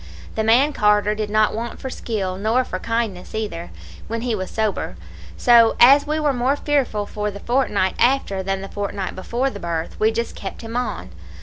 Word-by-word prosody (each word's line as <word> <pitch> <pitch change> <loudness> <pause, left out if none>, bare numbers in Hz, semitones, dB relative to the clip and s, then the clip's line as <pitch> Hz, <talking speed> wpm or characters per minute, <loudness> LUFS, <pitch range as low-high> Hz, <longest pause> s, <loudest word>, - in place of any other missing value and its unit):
The 220 - -1
man 250 +7 +4
Carter 210 -1 +3
did 215 -1 -3
not 215 0 +3
want 235 +2 -5
for 265 - -5
skill, 195 -7 -3
nor 220 +6 +1
for - - -5
kindness 230 -6 -3
either, 190 -6 -4 0.4
when 230 0 -3
he 240 -1 -1
was 185 -3 -3
sober; 210 - -2 0.4
so, 235 -2 +6
as 280 +4 +7
we 305 +1 0
were 295 -2 +1
more 255 +3 +1
fearful 275 -8 0
for 210 0 -3
the 200 0 -8
fortnight 210 -6 +1
after 245 -7 +2
than 195 0 -2
the 195 - -6
fortnight 200 -1 -4
before 240 +8 -1
the 200 - -8
birth, 170 -2 -4
we 215 - +4
just 235 +1 -3
kept 195 +4 -7
him 225 +1 -7
on. 215 - -3
220 Hz, 195 wpm, -21 LUFS, 200-245 Hz, 0.4 s, as